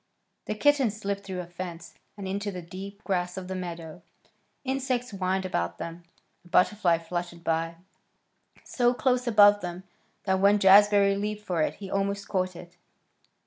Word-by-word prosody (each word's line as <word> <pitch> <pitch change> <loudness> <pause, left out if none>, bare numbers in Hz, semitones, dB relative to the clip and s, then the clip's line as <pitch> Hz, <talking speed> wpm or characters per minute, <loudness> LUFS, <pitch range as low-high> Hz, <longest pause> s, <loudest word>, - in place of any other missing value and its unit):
The 215 - -3
kittens 265 -4 +2
slipped 200 -1 -3
through 190 -2 -4
a - - -8
fence 175 -1 -8 0.2
and 195 -2 -6
into 200 +2 -2
the 180 -2 -7
deep 195 +4 -9
grass 180 -2 -1
of 185 -1 -6
the 190 - -4
meadow. 170 -2 -6 0.6
Insects 260 -2 -2
whined 190 -1 -1
about 85 - -2
them. 170 +1 -7 0.4
A - - -18
butterfly 180 -1 +3
fluttered 175 +1 -5
by, 165 0 -1 0.9
so 245 0 +1
close 250 -1 +1
above 205 -2 +6
them 175 +1 -6 0.4
that 190 -1 +1
when 200 +2 +5
Jazbury 200 0 +6
leaped 210 0 -4
for 175 -4 0
it - - 0
he 195 -2 -9
almost 200 +1 -1
caught 185 -2 -1
it. 175 +1 -12
190 Hz, 160 wpm, -27 LUFS, 175-205 Hz, 0.9 s, above